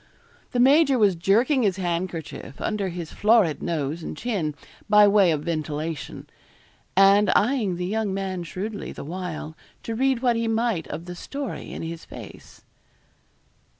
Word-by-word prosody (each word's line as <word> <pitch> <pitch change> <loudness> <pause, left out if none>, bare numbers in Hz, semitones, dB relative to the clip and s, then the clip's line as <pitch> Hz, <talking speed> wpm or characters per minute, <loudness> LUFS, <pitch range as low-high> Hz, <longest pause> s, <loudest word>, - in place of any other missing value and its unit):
The 245 - -1
major 275 +2 +5
was 205 -4 +4
jerking 230 - +2
his 200 -5 +2
handkerchief 170 -5 -4
under 205 -3 -1
his 170 -2 -6
florid 210 -7 +3
nose 160 -1 -2
and - - -6
chin, 190 -11 -2 0.3
by 210 0 +7
way 200 -3 +5
of 150 -2 -1
ventilation; 155 -1 -4 0.7
and 200 +2 +6
eyeing 215 -5 +2
the 180 +1 -3
young 215 +1 -1
man 190 -1 -3
shrewdly 195 +5 -5
the - - -8
while, 165 -2 -5 0.3
to 230 - -4
read 260 +1 +1
what 240 -2 +3
he 230 0 -1
might 225 -6 0
of 165 +3 -6
the 180 - -6
story 275 +8 -6
in - - -6
his 165 0 -6
face. - - -12
195 Hz, 150 wpm, -24 LUFS, 170-225 Hz, 0.7 s, by